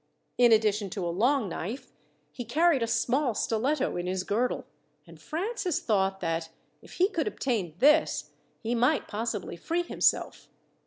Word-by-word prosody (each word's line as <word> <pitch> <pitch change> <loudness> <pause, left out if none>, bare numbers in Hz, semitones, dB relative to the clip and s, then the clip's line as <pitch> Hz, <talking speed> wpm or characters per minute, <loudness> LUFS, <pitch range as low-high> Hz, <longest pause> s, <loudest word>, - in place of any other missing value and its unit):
In 240 -1 +6
addition 215 -2 +3
to 185 - -2
a 170 - -2
long 245 +4 +2
knife, 210 - -6 0.4
he 245 - -6
carried 300 +4 +2
a 230 - +1
small 240 +2 +1
stiletto 260 +8 0
in 175 0 -3
his 185 0 -1
girdle, 230 +6 -1 0.4
and - - -15
Francis 365 - -2
thought 195 -3 0
that, 165 -1 -2 0.3
if - - -15
he 370 - +3
could 380 -4 -2
obtain 220 - -2
this, 300 - +3 0.3
he 230 +2 -1
might 250 +6 +2
possibly 215 -3 -3
free 335 - -2
himself. - - 0
235 Hz, 155 wpm, -28 LUFS, 200-290 Hz, 0.4 s, In